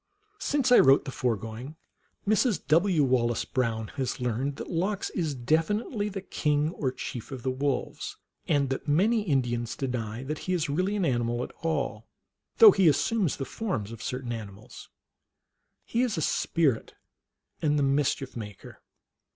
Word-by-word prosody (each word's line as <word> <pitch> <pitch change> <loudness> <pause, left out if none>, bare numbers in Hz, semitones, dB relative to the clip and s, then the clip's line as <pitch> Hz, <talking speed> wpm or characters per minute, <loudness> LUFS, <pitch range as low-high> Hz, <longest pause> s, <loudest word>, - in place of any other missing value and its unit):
Since 275 -3 +1
I 245 - +9
wrote 135 +1 +6
the 135 - -4
foregoing, 115 +3 -3 0.5
Mrs. 215 +1 +3
W. 165 +1 +3
Wallace 120 -3 +1
Brown 115 -4 -1
has 130 -2 -2
learned 125 +3 -1
that - - -7
Lox 190 +4 -1
is 160 -6 -2
definitely 205 - 0
the 195 -2 -6
king 150 -3 0
or 135 -7 -2
chief 120 -2 -6
of 130 -3 -6
the 130 - 0
wolves, 135 0 -2 0.3
and 140 -3 +2
that 135 - -3
many 205 +10 +3
Indians 120 - -1
deny 120 -2 -3
that 150 +3 -4
he - - +2
is 160 -5 0
really 185 +7 0
an 195 -4 +1
animal 120 -2 0
at - - -7
all, 135 -9 -2 0.5
though 445 -2 +10
he 190 - +3
assumes 185 +3 +2
the 135 - -3
forms 130 - -3
of 115 -1 -9
certain 125 0 -4
animals. 105 -2 -9 1.0
He 235 - 0
is 240 -7 0
a - - 0
spirit, 140 -8 0 0.7
and 150 -1 +2
the 145 - +2
Mischief 135 -1 0
Maker. 105 -4 -9
140 Hz, 160 wpm, -28 LUFS, 120-175 Hz, 1.0 s, though